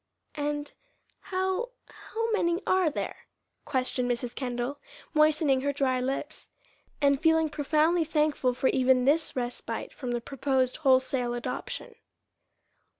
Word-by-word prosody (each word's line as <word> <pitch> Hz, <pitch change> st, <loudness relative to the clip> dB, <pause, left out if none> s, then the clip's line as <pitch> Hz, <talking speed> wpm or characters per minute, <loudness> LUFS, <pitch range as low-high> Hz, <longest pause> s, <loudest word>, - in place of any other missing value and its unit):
"And 295 Hz, 0 st, -3 dB, 0.5 s
how 375 Hz, +5 st, -1 dB, 0.2 s
how 455 Hz, +1 st, -4 dB
many 345 Hz, -4 st, +1 dB
are 370 Hz, -3 st, +3 dB
there?" 295 Hz, -, -5 dB, 0.4 s
questioned 255 Hz, -2 st, -1 dB
Mrs. 245 Hz, 0 st, -2 dB
Kendall, 245 Hz, +2 st, -3 dB, 0.3 s
moistening 305 Hz, -3 st, +4 dB
her 285 Hz, +1 st, 0 dB
dry 270 Hz, -2 st, +1 dB
lips, 275 Hz, +4 st, -4 dB, 0.5 s
and 280 Hz, -2 st, +3 dB
feeling 320 Hz, -1 st, +4 dB
profoundly 310 Hz, +3 st, +2 dB
thankful 300 Hz, -5 st, +1 dB
for 260 Hz, -, +2 dB
even 255 Hz, -1 st, +3 dB
this 310 Hz, +3 st, +2 dB
respite 245 Hz, -1 st, -4 dB
from 255 Hz, -, -6 dB
the 240 Hz, 0 st, 0 dB
proposed 260 Hz, 0 st, 0 dB
wholesale 260 Hz, -3 st, +2 dB
adoption. 240 Hz, -, -5 dB
280 Hz, 120 wpm, -28 LUFS, 255-315 Hz, 0.5 s, moistening